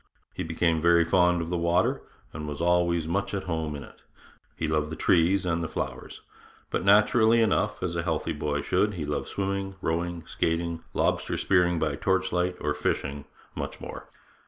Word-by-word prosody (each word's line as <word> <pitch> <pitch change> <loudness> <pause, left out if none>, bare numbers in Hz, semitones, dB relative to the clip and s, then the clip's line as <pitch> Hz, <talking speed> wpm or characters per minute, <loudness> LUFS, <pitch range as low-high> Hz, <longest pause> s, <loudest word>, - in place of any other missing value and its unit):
He - - -5
became 85 -2 0
very 85 0 +5
fond 90 0 +3
of 80 - -6
the 90 - 0
water, 85 +2 +1 0.3
and 75 -1 -6
was 75 -1 -5
always 85 -1 +2
much 100 +4 -1
at 95 - -3
home 80 -3 -3
in 70 - -7
it. - - -16 0.5
He 80 - -2
loved 75 -1 0
the 80 - -5
trees 90 +4 +3
and 85 -1 0
the 85 - -2
flowers; - - -5 0.5
but - - -1
naturally 110 +3 +5
enough, 105 -1 +1
as 85 -1 -2
a 85 - 0
healthy 85 -1 -1
boy 75 -1 -2
should, 105 -1 +1
he 80 -4 -3
loved 75 0 -3
swimming, 100 0 -3
rowing, 85 0 -2
skating, 85 0 -1
lobster - - 0
spearing 90 -2 +2
by 75 -3 -1
torch 95 +2 +1
light, 90 0 0
or 75 0 -1
fishing, 70 -1 -2 0.3
much - - -5
more. - - -8
85 Hz, 180 wpm, -27 LUFS, 80-90 Hz, 0.5 s, very